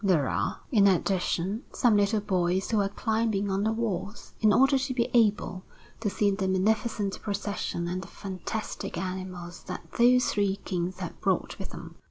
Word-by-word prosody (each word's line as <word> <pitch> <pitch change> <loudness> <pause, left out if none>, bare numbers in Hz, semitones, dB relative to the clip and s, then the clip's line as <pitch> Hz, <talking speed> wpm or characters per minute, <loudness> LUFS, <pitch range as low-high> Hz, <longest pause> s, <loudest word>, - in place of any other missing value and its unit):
There 170 -9 +3
are, - - -1
in 205 -5 +6
addition, 190 +2 +1
some 240 -4 +4
little 205 +1 +2
boys 185 -1 0
who 215 -2 +3
are 195 - 0
climbing 220 -2 0
on 190 +1 0
the 220 - +2
walls, 210 -2 -3
in 215 -1 +5
order 270 +5 +5
to 260 0 -2
be 235 -2 0
able 210 -5 +2 0.4
to 220 -2 0
see 205 +1 +2
the 195 -1 -1
magnificent 205 +2 0
procession 200 -4 -3
and 180 +1 -2
the - - -9
fantastic 195 +3 -5
animals 185 -1 -5
that - - -6
those 250 +1 +6
three 200 -2 +1
Kings 180 -1 -2
have - - -6
brought - - 0
with - - -5
them. - - -9
200 Hz, 175 wpm, -28 LUFS, 185-220 Hz, 0.4 s, in